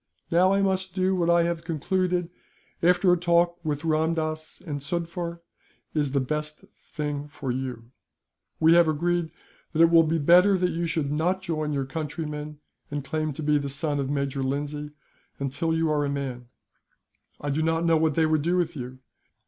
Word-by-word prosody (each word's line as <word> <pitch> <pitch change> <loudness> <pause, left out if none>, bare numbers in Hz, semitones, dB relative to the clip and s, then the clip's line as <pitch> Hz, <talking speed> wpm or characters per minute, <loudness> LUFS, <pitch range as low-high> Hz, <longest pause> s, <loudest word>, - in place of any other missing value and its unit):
"Now 180 +3 +4
I 195 0 +2
must 190 -1 -1
do 190 0 +2
what 170 -2 +1
I 170 0 +5
have 170 -1 -2
concluded, 175 +2 -1 0.5
after 180 +1 +4
a 180 - +1
talk 170 0 +2
with 150 -1 -2
Ramdass 155 0 -1
and 145 -4 -3
Sufder, 170 +2 -4 0.5
is 145 -3 0
the 140 - +3
best 150 +3 -3 0.3
thing 150 -2 -3
for 140 -3 -5
you. 125 -2 -5 0.7
We 160 +1 +6
have 170 -1 +6
agreed 170 +2 0 0.4
that 160 - +2
it 165 - +5
will 165 -1 +8
be 165 +1 +1
better 180 +6 +5
that 180 0 +1
you 170 +1 -2
should 150 -3 -1
not 180 +5 0
join 155 -4 -2
your 140 -2 -1
countrymen, 150 0 -5 0.3
and 145 -1 -4
claim 155 +1 -1
to 155 - -6
be 150 0 +3
the 140 -1 -4
son 145 +1 -1
of 135 -1 -2
Major 140 -1 -1
Lindsay, 145 +2 -3 0.5
until 140 +4 -2
you 160 -1 +1
are 150 -1 +1
a 145 - -1
man. 130 -4 -4 0.9
I 145 - -3
do 150 +3 0
not 165 +1 +1
know 165 -1 +4
what 155 -2 +1
they 160 - +3
would 155 -1 +2
do 175 +4 +1
with 170 -1 0
you. 130 -1 -7
155 Hz, 185 wpm, -26 LUFS, 145-170 Hz, 0.9 s, will